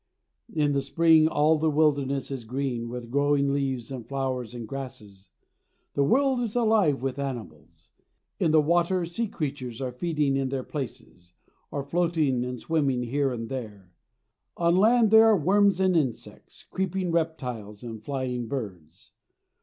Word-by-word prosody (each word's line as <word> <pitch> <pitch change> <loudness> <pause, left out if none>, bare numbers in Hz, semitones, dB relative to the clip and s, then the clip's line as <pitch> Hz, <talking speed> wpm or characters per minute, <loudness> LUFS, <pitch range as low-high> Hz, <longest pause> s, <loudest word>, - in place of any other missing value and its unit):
In 150 -7 +1
the 140 -1 +1
spring 155 +3 +4
all 155 0 +3
the 160 +1 +2
wilderness 140 -3 +1
is 130 -3 -4
green 120 -1 -3
with 120 -1 -7
growing 140 0 +2
leaves 135 -4 -2
and 130 -3 -5
flowers 130 -3 -3
and 115 -2 -6
grasses. 105 -8 -9 0.6
The 140 - +2
world 265 - +2
is 235 -3 -3
alive 215 - +2
with 135 +1 -2
animals. 115 - -7 0.5
In - - +2
the 155 -1 +4
water 175 +3 +2
sea 195 +8 -2
creatures 135 - -5
are 130 -2 -3
feeding 150 0 0
in 135 -1 0
their 130 -1 -3
places, 110 - -8 0.4
or 140 - -4
floating 155 -4 0
and 125 0 -5
swimming 140 -6 0
here 135 +3 0
and 115 -2 -4
there. 105 -8 -7 0.7
On 170 0 +3
land 220 +3 +4
there 220 0 +8
are 220 -2 +5
worms 195 +3 +3
and 185 -1 +3
insects, 135 -8 -3
creeping 190 -1 -2
reptiles 125 -11 -3
and 110 -2 -8
flying 125 -3 -3
birds. 95 - -7
140 Hz, 155 wpm, -26 LUFS, 125-165 Hz, 0.7 s, there